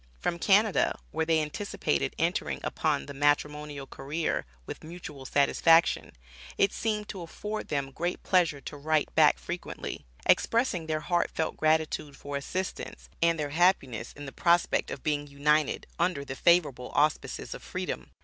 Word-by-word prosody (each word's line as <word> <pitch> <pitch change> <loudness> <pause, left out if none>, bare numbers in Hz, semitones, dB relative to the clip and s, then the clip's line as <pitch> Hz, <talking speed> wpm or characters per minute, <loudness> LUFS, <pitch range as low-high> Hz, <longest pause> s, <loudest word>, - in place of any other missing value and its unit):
From 170 - -1
Canada, 205 +3 +3
where 160 0 -1
they 160 -1 +3
anticipated 150 - -2
entering - - 0
upon 70 - 0
the - - -8
matrimonial 145 0 0
career 145 - -3 0.2
with - - -8
mutual 155 -5 -8
satisfaction, 165 +4 +4 0.4
it 195 - +3
seemed 210 -2 -1
to 190 - -6
afford 210 +6 -5
them 140 -2 -2
great 175 +6 -3
pleasure 170 -6 +2
to 145 - -8
write 155 +1 0
back - - +5
frequently, 60 - -6 0.2
expressing 225 -9 +2
their 155 -1 -1
heartfelt 170 -1 0
gratitude 155 -2 0
for 145 0 -6
assistance, 185 +7 -4
and 165 0 +3
their 145 -1 -2
happiness 145 - +2
in 145 - -9
the 135 - -7
prospect 170 +3 +2
of - - -6
being 145 -1 0
united 145 +1 +1
under 170 -5 0
the 135 - -5
favorable 145 -7 +3
auspices 150 +1 0
of - - -9
freedom! - - -5
155 Hz, 150 wpm, -29 LUFS, 145-175 Hz, 0.4 s, back